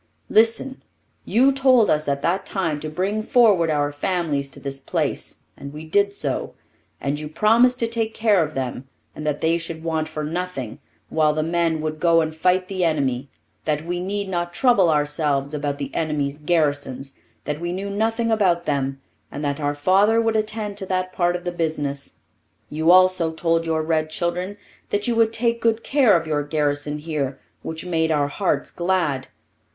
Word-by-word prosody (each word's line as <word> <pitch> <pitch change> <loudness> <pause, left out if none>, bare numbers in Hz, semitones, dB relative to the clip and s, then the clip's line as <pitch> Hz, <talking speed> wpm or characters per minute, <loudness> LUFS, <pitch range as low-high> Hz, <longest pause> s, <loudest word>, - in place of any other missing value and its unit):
Listen! 230 +4 +2 0.4
You 265 +4 +4
told 260 -4 +4
us 150 0 +1
at 140 0 -1
that 185 +3 +1
time 165 -7 -2
to 155 - -5
bring 190 +7 -1
forward 215 -8 +4
our 145 -1 +1
families 145 -3 -1
to - - -11
this 135 -1 -5
place, 135 - -3
and 140 - -9
we 155 +2 -9
did 200 +5 +2
so, 145 -9 -3 0.4
and 140 +1 -2
you 150 0 -6
promised 230 +9 +4
to 230 - +2
take 225 -1 -2
care 210 -6 +3
of - - -6
them 130 0 -4 0.3
and 150 - -5
that 145 -1 -1
they 165 +1 +2
should 165 -1 -6
want 160 -1 -1
for 155 -1 -5
nothing, 155 -7 -4 0.3
while 155 -1 +2
the 155 - 0
men 165 -1 0
would 155 0 -3
go 170 0 +4
and 160 0 -3
fight 180 +3 +2
the 185 -2 -2
enemy; 140 -5 0 0.4
that 150 +1 -1
we 175 +1 -2
need 200 +2 -3
not 175 -2 -3
trouble 220 -9 +4
ourselves 145 -2 0
about 145 -1 -2
the 140 - -5
enemy's 150 -2 -1
garrisons; 145 -4 0 0.3
that 150 +2 -3
we 175 0 -2
knew 190 +3 -4
nothing 225 +3 0
about 180 -6 +2
them 135 -2 -1 0.3
and 145 - -5
that 140 +1 -1
our 145 -1 -1
father 195 +9 +3
would 225 -1 +1
attend 215 -1 -2
to 195 - -4
that 185 0 -2
part 175 -1 +1
of 175 - -5
the 175 - -2
business. 150 -5 -3 0.5
You 160 +2 +1
also 185 -2 +5
told 165 0 0
your 160 -1 0
red 155 -1 0
children 180 +5 -2 0.3
that 205 +2 -1
you 240 - +1
would 225 -1 +4
take 235 +1 0
good 230 0 +1
care 260 -9 +4
of 165 - -9
your 150 -2 0
garrison 145 0 -1
here, 150 -3 -3 0.2
which 160 +2 -5
made 165 -2 0
our 145 -2 +1
hearts 195 +5 -1
glad. 170 -7 0
165 Hz, 185 wpm, -22 LUFS, 150-195 Hz, 0.5 s, also